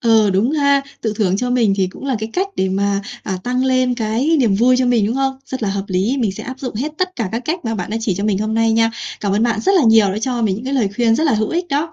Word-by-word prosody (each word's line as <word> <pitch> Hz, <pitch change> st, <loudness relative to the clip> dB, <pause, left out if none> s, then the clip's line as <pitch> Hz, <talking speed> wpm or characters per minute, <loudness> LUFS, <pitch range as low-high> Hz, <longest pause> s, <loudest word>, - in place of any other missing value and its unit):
Ừ, 225 Hz, -3 st, +4 dB
đúng 195 Hz, +7 st, +1 dB
ha, 280 Hz, -2 st, +2 dB, 0.2 s
tự 220 Hz, -2 st, -1 dB
thưởng 195 Hz, -3 st, +1 dB
cho 250 Hz, +4 st, -2 dB
mình 230 Hz, -5 st, +2 dB
thì 190 Hz, -2 st, +1 dB
cũng 185 Hz, -, -10 dB
là 270 Hz, -3 st, 0 dB
cái 220 Hz, +1 st, -4 dB
cách 385 Hz, +2 st, -1 dB
để 190 Hz, -, +1 dB
mà, 200 Hz, +1 st, 0 dB, 0.2 s
à, 190 Hz, -2 st, -3 dB
tăng 250 Hz, +1 st, 0 dB
lên 255 Hz, -1 st, +2 dB
cái 240 Hz, +7 st, 0 dB
niềm 225 Hz, -6 st, +3 dB
vui 245 Hz, +5 st, +4 dB
cho 255 Hz, -, +2 dB
mình, 235 Hz, -4 st, +2 dB
đúng 225 Hz, -, -1 dB
không? 270 Hz, 0 st, -1 dB
Rất 260 Hz, -3 st, -5 dB
là 210 Hz, -, 0 dB
hợp 195 Hz, 0 st, -3 dB
lý. 195 Hz, +8 st, 0 dB
Mình 220 Hz, -6 st, 0 dB
sẽ -, -, -8 dB
áp 260 Hz, +1 st, -8 dB
dụng 255 Hz, -5 st, -5 dB
hết 285 Hz, +8 st, -3 dB
tất 370 Hz, 0 st, -1 dB
cả 225 Hz, -6 st, -2 dB
các 230 Hz, +2 st, -2 dB
cách 330 Hz, +2 st, -3 dB
mà 225 Hz, -, -2 dB
các 225 Hz, -, -1 dB
bạn 185 Hz, -1 st, -4 dB
đã 220 Hz, -, -1 dB
chỉ 220 Hz, -4 st, -1 dB
cho 200 Hz, +3 st, -3 dB
mình 205 Hz, -3 st, +1 dB
hôm 215 Hz, +1 st, -2 dB
nay 225 Hz, 0 st, +2 dB
nha. 225 Hz, 0 st, +3 dB, 0.3 s
Cảm 200 Hz, -2 st, -1 dB
ơn 210 Hz, +2 st, +1 dB
bạn 230 Hz, -3 st, +1 dB
rất 390 Hz, -, +2 dB
là 360 Hz, -, +4 dB
nhiều 225 Hz, -2 st, +5 dB
đã 210 Hz, -, -3 dB
cho 245 Hz, 0 st, -1 dB
mình 205 Hz, -4 st, +1 dB
những 225 Hz, -, -8 dB
cái 270 Hz, +2 st, -2 dB
lời 230 Hz, -7 st, +2 dB
khuyên 235 Hz, -2 st, +3 dB
rất 315 Hz, -, 0 dB
là 285 Hz, -, +3 dB
hữu 215 Hz, 0 st, 0 dB
ích 350 Hz, +1 st, -2 dB
đó. 310 Hz, +2 st, -1 dB
230 Hz, 325 wpm, -18 LUFS, 210-260 Hz, 0.3 s, nhiều